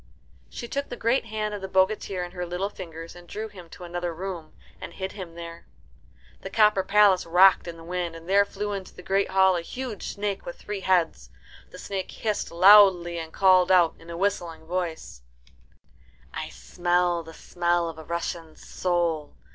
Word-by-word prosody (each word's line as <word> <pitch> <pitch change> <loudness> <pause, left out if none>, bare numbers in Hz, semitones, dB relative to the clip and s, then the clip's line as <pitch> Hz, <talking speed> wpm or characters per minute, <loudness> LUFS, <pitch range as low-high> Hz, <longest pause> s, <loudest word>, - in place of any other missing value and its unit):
She 235 - -7
took 280 +3 -3
the - - -5
great 235 +2 +1
hand 215 -1 -3
of 205 - -5
the 190 - -4
bogatir 190 -1 +1
in 175 - -7
her 180 -1 -5
little 180 +3 -3
fingers, 165 -3 -9
and 175 0 -14
drew 220 +4 -5
him 180 -5 -13
to 180 - -12
another 175 -1 -4
room, 175 -3 -6 0.3
and 170 - -8
hid 190 +1 -5
him 180 -5 -9
there. 170 0 -9 0.7
The 195 - -6
copper 210 -2 +4
palace 200 -2 +4
rocked 185 +2 +5
in 170 -1 -7
the 165 - -12
wind, 175 -1 -3
and 165 0 -11
there 200 +2 +5
flew 205 +1 -5
into 195 -2 -7
the 180 - -11
great 195 +2 +1
hall 190 -1 +4
a 175 - -1
huge 245 +4 -6
snake 200 -1 -3
with 175 - -7
three 205 -1 -5
heads. 185 -3 +1 0.4
The - - -12
snake 195 -2 -5
hissed 215 -2 -3
loudly, 180 -2 +6
and 160 -1 -7
called 185 -1 +4
out 175 -3 +5
in 165 - -15
a 170 - -6
whistling 175 -4 -2
voice, 170 - -4 1.1
"I - - -5
smell 175 -1 0
the 165 0 -12
smell 175 -1 0
of 160 -1 -7
a - - -9
Russian 170 0 -4
soul. 170 -4 -2
180 Hz, 185 wpm, -26 LUFS, 170-195 Hz, 1.1 s, loudly